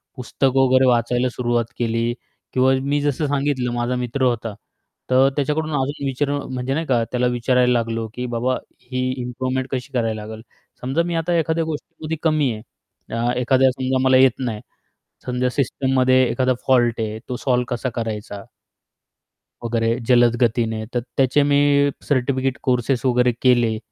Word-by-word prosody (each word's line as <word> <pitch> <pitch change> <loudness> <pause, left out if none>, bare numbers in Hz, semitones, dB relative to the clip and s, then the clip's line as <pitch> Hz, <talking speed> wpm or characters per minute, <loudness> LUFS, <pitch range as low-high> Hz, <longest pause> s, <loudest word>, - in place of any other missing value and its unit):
पुस्तकं 130 +1 0
वगैरे 130 0 +4
वाचायला 120 +1 +2
सुरुवात 120 -2 0
केली 115 0 0 0.4
किंवा 130 +1 +3
मी 145 +1 0
जसं 145 +1 0
सांगितलं 140 -3 -1
माझा 120 +1 -1
मित्र 125 +2 -2
होता 115 -3 0 0.6
तर 130 +1 +5
त्याच्याकडून 150 +2 -1
अजून 140 +1 -2
विचारून 140 0 -2
म्हणजे 130 +1 -2
नाही 160 +2 -1
का 120 -4 +1
त्याला 125 0 +1
विचारायला 125 +1 +2
लागलो 115 -1 -1
की 125 - -4
"बाबा, 125 +2 0 0.3
ही 130 +1 -5 0.2
इम्प्रूवमेंट 130 +2 -3
कशी 130 +1 -4
करायला 115 -3 -1
लागेल?" 110 0 -8 0.4
समजा 135 +7 0
मी 170 -1 -3
आता 165 +2 0
एखाद्या 165 0 0
गोष्टीमध्ये 160 0 -5
कमी 155 -5 +2
आहे, 110 - -8 0.5
अ, 120 +1 0
एखाद्या 130 +1 +3
समजा 130 0 -1
मला 130 0 +5
येत 130 -2 +4
नाही. 115 -5 -3 0.6
समजा 125 0 0
सिस्टममध्ये 130 0 +2
एखादा 130 +1 +1
फॉल्ट 120 -3 +3
आहे 110 0 -3
तो 125 - -2
सॉल्व्ह 125 -2 0
कसा 130 +2 -3
करायचा 105 -3 -5 1.2
वगैरे 115 0 0
जलद 120 -1 +5
गतीने 110 -2 +1
तर 120 - +1 0.2
त्याचे 135 +2 +3
मी 145 0 +4 0.5
सर्टिफिकेट 130 -1 0
कोर्स 125 +1 +1
वगैरे 125 -1 +3
केले. 120 -4 +3
125 Hz, 155 wpm, -21 LUFS, 120-135 Hz, 1.2 s, तर